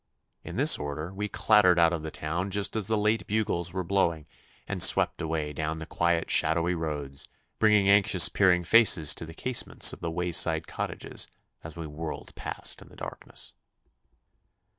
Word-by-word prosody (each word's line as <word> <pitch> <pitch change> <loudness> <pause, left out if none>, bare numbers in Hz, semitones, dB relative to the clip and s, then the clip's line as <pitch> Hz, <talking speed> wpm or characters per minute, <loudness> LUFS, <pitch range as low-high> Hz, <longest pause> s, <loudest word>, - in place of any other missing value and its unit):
In - - -9
this - - +4
order 75 +5 -6
we 105 +2 -5
clattered 100 -6 +3
out 85 0 +3
of 80 - -4
the 80 - -6
town 85 +6 -4
just 100 +1 -2
as 110 -3 0
the 110 -1 0
late 105 +2 -1
bugles 100 -5 -2
were 95 +1 -4
blowing, 85 -4 -1 0.4
and - - -5
swept - - +5
away 80 -2 -4
down 80 +2 -4
the 80 - -8
quiet 85 0 -1
shadowy 85 +3 +1
roads, 75 -5 -6 0.3
bringing 105 -2 +3
anxious 100 -4 +6
peering 90 -3 +2
faces 85 -6 +4
to 80 - -6
the 80 - -12
casements 130 +5 +3
of - - -11
the 85 - -5
wayside 85 -1 0
cottages - - -4 0.4
as 80 -1 -10
we 85 -1 -7
whirled 75 +1 -8
past - - -5
in - - -15
the - - -18
darkness. - - -8
85 Hz, 170 wpm, -26 LUFS, 80-100 Hz, 0.4 s, anxious